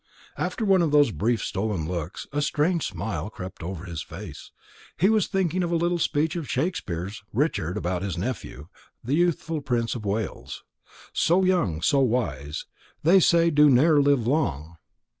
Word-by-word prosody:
After 225 Hz, -, -2 dB
one 190 Hz, -2 st, +4 dB
of 165 Hz, -, +2 dB
those 145 Hz, -4 st, +4 dB
brief 115 Hz, +3 st, 0 dB
stolen 95 Hz, -6 st, -2 dB
looks, 85 Hz, 0 st, -4 dB
a 145 Hz, -, 0 dB
strange 150 Hz, +3 st, +1 dB
smile 95 Hz, -1 st, -4 dB
crept 95 Hz, -3 st, -9 dB
over 90 Hz, +1 st, -6 dB
his 85 Hz, -3 st, -5 dB
face. -, -, -9 dB, 0.5 s
He 190 Hz, -, +4 dB
was 220 Hz, -3 st, +2 dB
thinking 185 Hz, -2 st, 0 dB
of 175 Hz, -, -1 dB
a -, -, +2 dB
little 175 Hz, +1 st, +1 dB
speech 155 Hz, +1 st, 0 dB
of 165 Hz, -5 st, -5 dB
Shakespeare's 100 Hz, -, -3 dB
Richard 105 Hz, -, -1 dB
about 90 Hz, -2 st, -2 dB
his 95 Hz, -3 st, -3 dB
nephew, 90 Hz, -, -5 dB, 0.4 s
the 125 Hz, +4 st, -2 dB
youthful 165 Hz, -1 st, 0 dB
Prince 120 Hz, -4 st, -1 dB
of 120 Hz, -, -6 dB
Wales: 105 Hz, 0 st, -4 dB, 0.5 s
So 180 Hz, +3 st, +3 dB
young, 100 Hz, -, +1 dB
so 140 Hz, +11 st, +3 dB
wise, 80 Hz, -, -1 dB, 0.4 s
they 175 Hz, +5 st, +6 dB
say 170 Hz, -1 st, +4 dB
do 150 Hz, 0 st, +6 dB
ne'er 145 Hz, +3 st, +5 dB
live 140 Hz, -5 st, +2 dB
long. 85 Hz, -, -1 dB
125 Hz, 165 wpm, -25 LUFS, -, 0.5 s, they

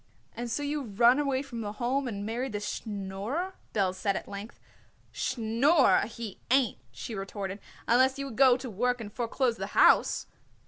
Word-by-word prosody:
"And 240 Hz, 0 st, -4 dB
so 290 Hz, +5 st, -2 dB
you 290 Hz, +1 st, -1 dB
run 240 Hz, +3 st, +4 dB
away 275 Hz, -2 st, 0 dB
from 240 Hz, -4 st, -6 dB
the 205 Hz, -1 st, -4 dB
Home 255 Hz, +4 st, -1 dB
and 205 Hz, -3 st, -4 dB
married 235 Hz, +2 st, -3 dB
this 205 Hz, 0 st, -3 dB
Schnorrer?" 210 Hz, -, -4 dB, 0.2 s
Belz 190 Hz, -3 st, 0 dB
said 200 Hz, 0 st, 0 dB
at -, -, -5 dB
length. 200 Hz, +3 st, -8 dB, 0.5 s
"Schnorrer 255 Hz, +5 st, +3 dB
he 230 Hz, -3 st, -7 dB
ain't," 255 Hz, -, +3 dB
she 175 Hz, -, -7 dB
retorted, 195 Hz, 0 st, -5 dB, 0.3 s
"unless 260 Hz, +3 st, +4 dB
you 275 Hz, -, -3 dB
would 265 Hz, -5 st, -7 dB
go 255 Hz, -1 st, +6 dB
to 255 Hz, -, -7 dB
work 245 Hz, +3 st, 0 dB
and 210 Hz, -2 st, -8 dB
foreclose 240 Hz, 0 st, 0 dB
the -, -, -4 dB
house." -, -, +5 dB
235 Hz, 175 wpm, -29 LUFS, 205-260 Hz, 0.5 s, go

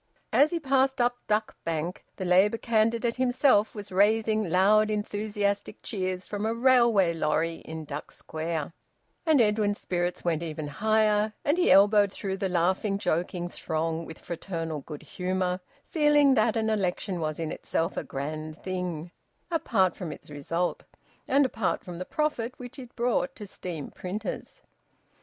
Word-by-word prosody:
As 290 Hz, -, +6 dB
he 340 Hz, -, -1 dB
passed 270 Hz, -2 st, +2 dB
up 245 Hz, 0 st, +2 dB
Duck 215 Hz, 0 st, 0 dB
Bank 165 Hz, +2 st, -3 dB
the 185 Hz, -, -4 dB
Labour 190 Hz, +5 st, +4 dB
candidate 230 Hz, +1 st, +1 dB
himself 250 Hz, -4 st, +3 dB
was 205 Hz, -2 st, -7 dB
raising 215 Hz, +1 st, +2 dB
loud 205 Hz, +5 st, +4 dB
enthusiastic 205 Hz, -1 st, -2 dB
cheers 185 Hz, -3 st, -3 dB
from 205 Hz, 0 st, -4 dB
a 225 Hz, +1 st, 0 dB
railway 235 Hz, -8 st, +4 dB
lorry 165 Hz, +1 st, 0 dB
in 160 Hz, 0 st, -8 dB
Duck 145 Hz, 0 st, -6 dB
Square, 160 Hz, -1 st, -4 dB, 0.5 s
and 310 Hz, -3 st, +5 dB
Edwin's 210 Hz, -2 st, +2 dB
spirits 175 Hz, 0 st, -2 dB
went 165 Hz, -2 st, +1 dB
even 155 Hz, -2 st, -4 dB
higher, 215 Hz, +5 st, +2 dB
and 290 Hz, -, +3 dB
he 360 Hz, 0 st, +2 dB
elbowed 205 Hz, 0 st, +6 dB
through 195 Hz, -1 st, -4 dB
the 195 Hz, 0 st, -1 dB
laughing, 185 Hz, +3 st, +1 dB
joking 175 Hz, -1 st, -1 dB
throng 160 Hz, -1 st, -2 dB
with 160 Hz, -, -9 dB
fraternal 165 Hz, -3 st, -4 dB
good 150 Hz, +1 st, -9 dB
humour, 185 Hz, 0 st, -2 dB, 0.3 s
feeling 295 Hz, -3 st, +4 dB
that 225 Hz, -1 st, +2 dB
an 220 Hz, 0 st, +1 dB
election 190 Hz, -2 st, -1 dB
was 155 Hz, -1 st, -2 dB
in 160 Hz, -1 st, -2 dB
itself 165 Hz, +3 st, -2 dB
a -, -, -2 dB
grand 155 Hz, +3 st, -5 dB
thing, 180 Hz, -3 st, -4 dB, 0.4 s
apart 205 Hz, -, +2 dB
from 175 Hz, -5 st, -5 dB
its 150 Hz, -, -11 dB
result, 165 Hz, +5 st, -2 dB, 0.5 s
and 275 Hz, +1 st, +4 dB
apart 220 Hz, -7 st, -1 dB
from 175 Hz, -1 st, -8 dB
the 185 Hz, -, -4 dB
profit 260 Hz, -4 st, -2 dB
which 250 Hz, +2 st, -9 dB
it 250 Hz, -2 st, -11 dB
brought 240 Hz, -6 st, 0 dB
to 210 Hz, -, -8 dB
steam 175 Hz, -6 st, -6 dB
printers. 200 Hz, +4 st, -6 dB
195 Hz, 155 wpm, -27 LUFS, 170-225 Hz, 0.5 s, As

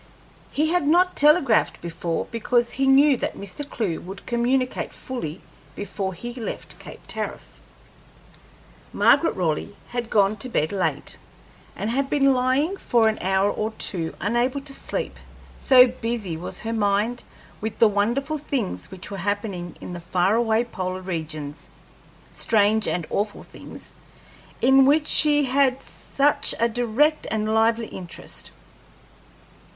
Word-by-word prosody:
He 310 Hz, +2 st, +1 dB
had 355 Hz, -5 st, +1 dB
not 360 Hz, +4 st, +4 dB
telegraphed 295 Hz, -5 st, +4 dB
before 170 Hz, 0 st, -3 dB
because 235 Hz, +1 st, +1 dB
he 270 Hz, +2 st, 0 dB
knew 275 Hz, 0 st, +6 dB
that -, -, -3 dB
Mr. 200 Hz, +9 st, -6 dB
Clewe 190 Hz, -8 st, -2 dB
would 195 Hz, +2 st, -9 dB
communicate 250 Hz, +2 st, 0 dB
fully 180 Hz, -12 st, -6 dB, 0.3 s
before 195 Hz, -1 st, -4 dB
he 240 Hz, +7 st, -7 dB
left 240 Hz, -3 st, -7 dB
Cape -, -, -11 dB
Tariff. -, -, -6 dB, 1.3 s
Margaret 330 Hz, -, +4 dB
Raleigh 170 Hz, +1 st, -2 dB
had 240 Hz, -2 st, -4 dB
gone 205 Hz, 0 st, +3 dB
to 255 Hz, +5 st, -4 dB
bed 155 Hz, -9 st, 0 dB
late, 195 Hz, -2 st, -2 dB, 0.6 s
and 215 Hz, -, -3 dB
had 270 Hz, +2 st, 0 dB
been 275 Hz, -2 st, +3 dB
lying 260 Hz, +9 st, +1 dB
for 235 Hz, -10 st, +2 dB
an 220 Hz, -, -3 dB
hour 190 Hz, +2 st, +2 dB
or 215 Hz, -, -2 dB
two 170 Hz, -6 st, 0 dB
unable 240 Hz, +7 st, 0 dB
to 275 Hz, 0 st, -4 dB
sleep, -, -, -4 dB, 0.4 s
so 255 Hz, -2 st, +7 dB
busy 230 Hz, -7 st, -3 dB
was 165 Hz, +3 st, -6 dB
her 225 Hz, 0 st, -3 dB
mind 215 Hz, +3 st, 0 dB, 0.4 s
with 220 Hz, 0 st, -4 dB
the 225 Hz, -, +6 dB
wonderful 240 Hz, +9 st, 0 dB
things 265 Hz, -8 st, -3 dB
which 190 Hz, +1 st, -10 dB
were 200 Hz, -, -4 dB
happening 195 Hz, -2 st, -3 dB
in -, -, -7 dB
the 175 Hz, -, -7 dB
far 180 Hz, +3 st, +1 dB
away 230 Hz, 0 st, +2 dB
polar 185 Hz, -5 st, -5 dB
regions 155 Hz, -5 st, -6 dB, 0.6 s
strange 220 Hz, -1 st, +2 dB
and 175 Hz, -3 st, -1 dB
awful 205 Hz, +1 st, -2 dB
things -, -, -12 dB, 0.7 s
in 265 Hz, +1 st, +6 dB
which 300 Hz, +2 st, +4 dB
she 295 Hz, -1 st, +4 dB
had 265 Hz, 0 st, +2 dB
such 285 Hz, +1 st, 0 dB
a 235 Hz, -, +4 dB
direct 245 Hz, +7 st, +1 dB
and 215 Hz, 0 st, -1 dB
lively 225 Hz, +1 st, +2 dB
interest. 170 Hz, -, -7 dB
225 Hz, 140 wpm, -23 LUFS, 195-265 Hz, 1.3 s, so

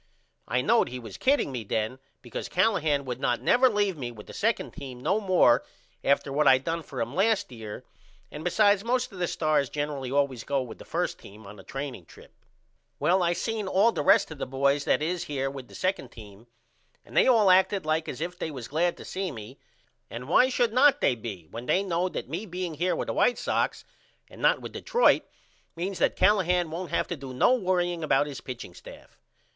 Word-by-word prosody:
I 125 Hz, -, +1 dB
knowed 230 Hz, -, +3 dB
he 125 Hz, -, -6 dB
was 115 Hz, -5 st, -9 dB
kidding 275 Hz, -, +2 dB
me 125 Hz, -3 st, -4 dB
then 110 Hz, +5 st, -2 dB, 0.2 s
because 120 Hz, -, -6 dB
Callahan 160 Hz, -8 st, +1 dB
would 125 Hz, -1 st, -4 dB
not 120 Hz, -2 st, 0 dB
never 255 Hz, +1 st, +4 dB
leave 205 Hz, -4 st, 0 dB
me 125 Hz, -4 st, -4 dB
with 105 Hz, -3 st, -12 dB
the -, -, -11 dB
2d 225 Hz, +2 st, -1 dB
team 135 Hz, -5 st, -8 dB
no 195 Hz, +11 st, +1 dB
more 185 Hz, -, +4 dB, 0.4 s
after 140 Hz, 0 st, +1 dB
what 150 Hz, +1 st, +2 dB
I 130 Hz, -, +7 dB
done 165 Hz, +5 st, -3 dB
for 140 Hz, -4 st, -8 dB
him 115 Hz, +3 st, -3 dB
last 205 Hz, -2 st, +1 dB
year 110 Hz, -3 st, -8 dB, 0.5 s
and 150 Hz, -, -7 dB
besides 205 Hz, +3 st, +3 dB
most 250 Hz, +1 st, 0 dB
of 190 Hz, -, -10 dB
the 175 Hz, -, 0 dB
stars 155 Hz, -5 st, +1 dB
generally 145 Hz, -3 st, -3 dB
allways 135 Hz, -4 st, 0 dB
goes 135 Hz, -3 st, -1 dB
with 115 Hz, -, -10 dB
the -, -, -11 dB
1st -, -, -2 dB
team 105 Hz, +2 st, -14 dB
on 100 Hz, +1 st, -10 dB
the -, -, -12 dB
training 135 Hz, -9 st, -6 dB
trip. -, -, -16 dB, 0.6 s
Well 185 Hz, +2 st, +2 dB
I 175 Hz, 0 st, +2 dB
seen 215 Hz, +3 st, -3 dB
all 200 Hz, +5 st, +4 dB
the -, -, -2 dB
rest 195 Hz, -1 st, +4 dB
of 155 Hz, -, -9 dB
the -, -, -3 dB
boys 140 Hz, +2 st, +1 dB
that -, -, +2 dB
is 175 Hz, +2 st, -2 dB
here 135 Hz, -2 st, -2 dB
with 135 Hz, -3 st, -9 dB
the -, -, -14 dB
2d 185 Hz, -9 st, -2 dB
team 105 Hz, 0 st, -14 dB, 0.6 s
and -, -, -14 dB
they -, -, +5 dB
all 220 Hz, -7 st, +5 dB
acted 190 Hz, 0 st, +3 dB
like 155 Hz, +1 st, 0 dB
as 130 Hz, -, -6 dB
if 175 Hz, +1 st, -4 dB
they -, -, -3 dB
was 130 Hz, -6 st, -7 dB
glad 170 Hz, +4 st, 0 dB
to -, -, -10 dB
see 190 Hz, 0 st, -3 dB
me 115 Hz, +1 st, -10 dB, 0.5 s
and 120 Hz, +2 st, -7 dB
why 250 Hz, -, +5 dB
should 240 Hz, -3 st, +1 dB
not 275 Hz, +3 st, +5 dB
they -, -, +3 dB
be 105 Hz, -8 st, -7 dB
when 120 Hz, +2 st, -7 dB
they 190 Hz, -, +2 dB
know 180 Hz, -1 st, 0 dB
that -, -, -5 dB
me 175 Hz, -, -5 dB
being 180 Hz, -2 st, -4 dB
here 175 Hz, +4 st, 0 dB
with -, -, -3 dB
the -, -, -3 dB
White -, -, +2 dB
Sox -, -, -1 dB, 0.4 s
and -, -, -14 dB
not -, -, +3 dB
with -, -, -7 dB
Detroit 485 Hz, +1 st, +3 dB, 0.5 s
means 185 Hz, +3 st, -4 dB
that -, -, +2 dB
Callahan 180 Hz, -4 st, +2 dB
won't 175 Hz, +2 st, -5 dB
have -, -, 0 dB
to 175 Hz, -, -2 dB
do 135 Hz, -3 st, -9 dB
no 185 Hz, -, +4 dB
worrying 180 Hz, -6 st, 0 dB
about 150 Hz, -, +3 dB
his 145 Hz, -2 st, -7 dB
pitching 120 Hz, -8 st, -8 dB
staff? -, -, -14 dB
155 Hz, 220 wpm, -27 LUFS, 130-190 Hz, 0.6 s, I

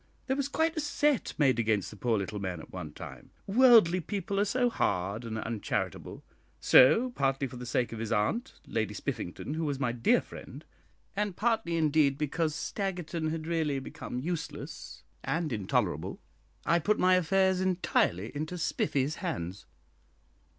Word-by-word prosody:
There 265 Hz, -, 0 dB
was 280 Hz, -1 st, -1 dB
quite 320 Hz, +3 st, 0 dB
a -, -, -1 dB
set 295 Hz, -3 st, +1 dB
made 135 Hz, -5 st, +3 dB
against 110 Hz, -4 st, +1 dB
the -, -, -10 dB
poor 115 Hz, +1 st, 0 dB
little 100 Hz, +1 st, -3 dB
man 95 Hz, -3 st, -3 dB
at -, -, -13 dB
one -, -, -6 dB
time -, -, -10 dB, 0.2 s
worldly 215 Hz, -5 st, +6 dB
people 195 Hz, +2 st, -3 dB
are 205 Hz, -, +3 dB
so 245 Hz, +4 st, +2 dB
hard 100 Hz, -, -1 dB
and 110 Hz, -1 st, -4 dB
uncharitable; 110 Hz, -1 st, -3 dB, 0.4 s
so, 225 Hz, -, +6 dB
partly 135 Hz, -, 0 dB
for 125 Hz, -1 st, -7 dB
the 125 Hz, 0 st, -7 dB
sake 120 Hz, 0 st, 0 dB
of 115 Hz, -, -6 dB
his 115 Hz, 0 st, -4 dB
aunt, 115 Hz, -, 0 dB
Lady 110 Hz, -1 st, -2 dB
Spiffington, 90 Hz, +11 st, -4 dB
who 160 Hz, +1 st, -2 dB
was 145 Hz, -3 st, -2 dB
my 125 Hz, -4 st, +1 dB
dear 120 Hz, -1 st, +3 dB
friend, -, -, -10 dB, 0.5 s
and 205 Hz, -2 st, -1 dB
partly, 215 Hz, -7 st, 0 dB
indeed, 150 Hz, -3 st, +3 dB
because 155 Hz, +1 st, -1 dB
Staggerton 175 Hz, -3 st, -3 dB
had 155 Hz, 0 st, -4 dB
really 160 Hz, -4 st, 0 dB
become 135 Hz, -1 st, -6 dB
useless 165 Hz, +5 st, -5 dB, 0.2 s
and 160 Hz, -4 st, -1 dB
intolerable, 105 Hz, -4 st, -1 dB, 0.5 s
I 170 Hz, +1 st, +3 dB
put 210 Hz, +6 st, +1 dB
my 185 Hz, 0 st, +4 dB
affairs 185 Hz, +1 st, +3 dB
entirely 160 Hz, -, +1 dB
into 155 Hz, +5 st, -3 dB
Spiffy's 145 Hz, -2 st, 0 dB
hands." 90 Hz, +4 st, -4 dB
155 Hz, 160 wpm, -30 LUFS, 120-190 Hz, 0.5 s, worldly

